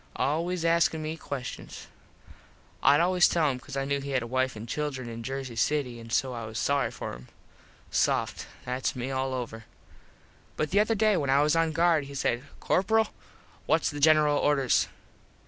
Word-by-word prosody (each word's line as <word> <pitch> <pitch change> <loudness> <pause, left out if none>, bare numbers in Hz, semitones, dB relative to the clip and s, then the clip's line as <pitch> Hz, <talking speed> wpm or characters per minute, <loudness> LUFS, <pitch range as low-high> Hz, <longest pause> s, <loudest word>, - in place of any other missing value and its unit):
Always 170 +4 -1
askin 165 -1 +2
me 155 +1 -3
questions. 140 -5 -7 1.0
Id 145 - +6
always 180 +1 +4
tell 160 -4 +2
him 130 - -5
cause 130 +1 -8
I 135 - -1
knew 140 0 -1
he 140 - -6
had 130 -3 0
a - - -5
wife 130 +1 0
and 110 +2 -8
children 135 -3 -3
in 115 0 -6
Jersey 130 0 -5
City 125 -1 0
an 115 0 -11
so 130 +2 0
I 115 -2 -5
was 110 0 -7
sorry 140 +1 +1
for - - -6
them. - - -10 0.6
Soft. - - 0 0.2
Thats 125 +2 -2
me 125 +1 -4
all 130 0 -1
over. 115 -3 -6 0.9
But 155 - -1
the 200 - +4
other 215 +2 +2
day 215 -1 +3
when 140 -4 -1
I 140 +2 +4
was 150 +2 +2
on 165 -1 +2
guard 165 -2 +3
he 140 0 -9
says, 120 -3 0 0.2
"Corperal, 220 +3 +2 0.6
whats 165 - +2
the 145 - -6
General 150 -1 +5
orders?" 140 -4 +2
140 Hz, 185 wpm, -28 LUFS, 130-160 Hz, 1.0 s, Id